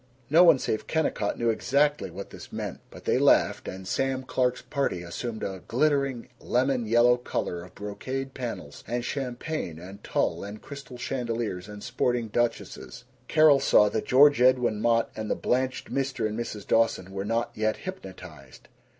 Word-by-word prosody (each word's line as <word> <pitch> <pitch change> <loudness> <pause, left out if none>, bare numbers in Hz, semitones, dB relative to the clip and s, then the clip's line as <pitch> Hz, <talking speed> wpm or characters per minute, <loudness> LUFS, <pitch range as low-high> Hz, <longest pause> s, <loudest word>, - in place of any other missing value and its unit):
No 165 +3 +8
one 165 -5 +7
save 110 -4 -2
Kennicott 150 -10 0
knew 115 -1 +2
exactly 145 +6 +1
what 100 - -8
this - - -11
meant, - - -5
but - - -13
they - - +2
laughed, - - +3
and 95 0 -7
Sam 135 +4 -1
Clark's 125 -1 0
party 130 - -2
assumed 110 +6 -5
a 95 -2 -4
glittering 140 -2 +1
lemon 125 -1 0
yellow 120 +2 +5
color 90 -7 -3
of 90 - -15
brocade 130 +7 -5
panels 125 -3 -6
and 120 +1 -2
champagne 130 - -4
and 95 +4 -11
tulle - - -1
and 100 +2 -7
crystal 140 -3 -10
chandeliers 115 -7 -3
and 105 -1 -9
sporting 120 -2 -1
duchesses. 120 +2 -2 0.2
Carol 155 -3 +6
saw 105 -5 +5
that 110 +1 -3
George 145 +1 +6
Edwin 125 -4 +3
Mott 115 0 +2
and 110 -1 -4
the - - +1
blanched 130 +1 -1
Mr. 135 -5 -1
and 105 - -4
Mrs. 110 -3 -5
Dawson 115 -5 +1
were 95 0 -4
not 115 +3 -1
yet 110 0 0
hypnotized. 90 - -10
120 Hz, 165 wpm, -27 LUFS, 105-135 Hz, 0.2 s, No